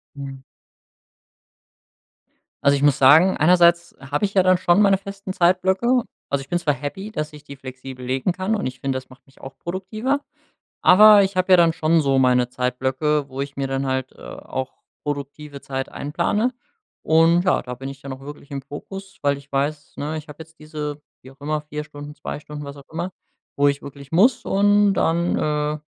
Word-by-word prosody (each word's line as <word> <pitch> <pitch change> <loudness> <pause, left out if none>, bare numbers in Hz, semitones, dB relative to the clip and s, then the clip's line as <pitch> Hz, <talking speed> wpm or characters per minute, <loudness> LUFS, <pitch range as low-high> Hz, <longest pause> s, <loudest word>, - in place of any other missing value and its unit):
Mhm 135 -1 -8 2.2
Also, 140 0 +5
ich 140 - -2
muss 145 -2 +4
sagen, 160 +8 +6
einerseits 170 +1 +4
hab 140 +2 -3
ich 200 -1 0
ja 190 -2 +4
dann 185 0 +4
schon 175 +2 +3
meine 195 -1 +5
festen 195 0 -8
Zeitblöcke. 190 +8 +2 0.3
Also 140 - 0
ich 135 - -12
bin 175 - 0
zwar 155 -4 +1
happy, 150 +9 -6
dass 155 -6 -4
ich 150 -1 -12
die 140 - -10
flexibel 130 -1 -9
legen 130 +7 0
kann 190 +4 -2
und 205 - -2
ich 130 - -8
find, 135 -1 -1
das 130 0 -6
macht 130 -1 -18
mich 135 - -23
auch 135 0 -10
produktiver, 215 +10 -2 0.6
aber 210 +2 +8
ich 195 0 -2
hab 185 0 +1
ja 185 - +8
dann 170 -1 +4
schon 160 0 +2
so 135 -2 +2
meine 125 -1 +3
Zeitblöcke, 130 +4 -1
wo 130 - -5
ich 140 0 -5
mir 140 - -1
dann 135 0 -2
halt, 130 0 -2
äh, - - -20
auch 130 0 -6 0.3
produktive 145 0 -6
Zeit 135 -1 -4
einplane. 175 - -1 0.5
Und 165 +2 +4
ja, 185 - +2
da 125 - -7
bin 135 +2 -7
ich 135 0 -10
ja 140 - -9
noch 130 0 -7
wirklich 145 +1 -11
im 140 -1 -4
Fokus, 195 +8 -9
weil 140 -1 +2
ich 140 0 -18
weiß, 145 +2 -2
ne, 150 +2 -3
ich 155 - -11
hab 150 - -11
jetzt 160 0 -13
diese, 150 -1 -6 0.2
wie 130 - -13
auch 135 - -21
immer, 150 +1 -2
4 150 0 -6
Stunden, 145 -1 -10
2 145 0 -6
Stunden, 150 0 -8
was 140 0 -8
auch 140 -1 -15
immer, 170 +3 -3 0.5
wo 145 0 +4
ich 140 0 -1
wirklich 140 -1 -11
muss 225 +9 +4
und 205 +1 +3
dann, 170 0 +1
äh, 150 0 -1
150 Hz, 200 wpm, -22 LUFS, 140-180 Hz, 2.2 s, aber